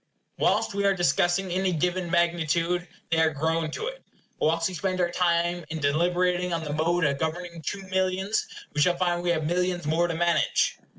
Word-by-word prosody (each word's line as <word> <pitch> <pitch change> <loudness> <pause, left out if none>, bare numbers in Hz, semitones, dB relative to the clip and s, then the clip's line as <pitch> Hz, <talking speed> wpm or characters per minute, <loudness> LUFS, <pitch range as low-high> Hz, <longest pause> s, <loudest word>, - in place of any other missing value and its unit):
Whilst - - +2
we 200 0 -1
are 195 -1 +3
discussing 175 +1 +1
any 185 +1 +1
given 180 +2 -1
magnitude, 170 0 +1 0.2
they 165 - +3
are 160 - +4
grown 160 +2 -1
to 155 - -4
it. - - -6 0.4
Whilst 165 +1 +2
we 185 - -6
spend 185 +1 -2
our 175 -1 +1
time 175 0 +1
in 160 - -4
deliberating 175 +4 +1
on 165 -1 -2
the 150 -2 -4
mode 165 +3 +1
of 140 -2 +1
governing 170 +1 -3
two 195 +5 -4
millions, 190 +2 0 0.3
we 150 - 0
shall 175 +3 +3
find 175 -1 0
we 175 - -1
have 160 -3 +1
millions 180 0 0
more 165 +3 +2
to 165 - -3
manage. 170 +1 +1
175 Hz, 190 wpm, -26 LUFS, 165-180 Hz, 0.4 s, are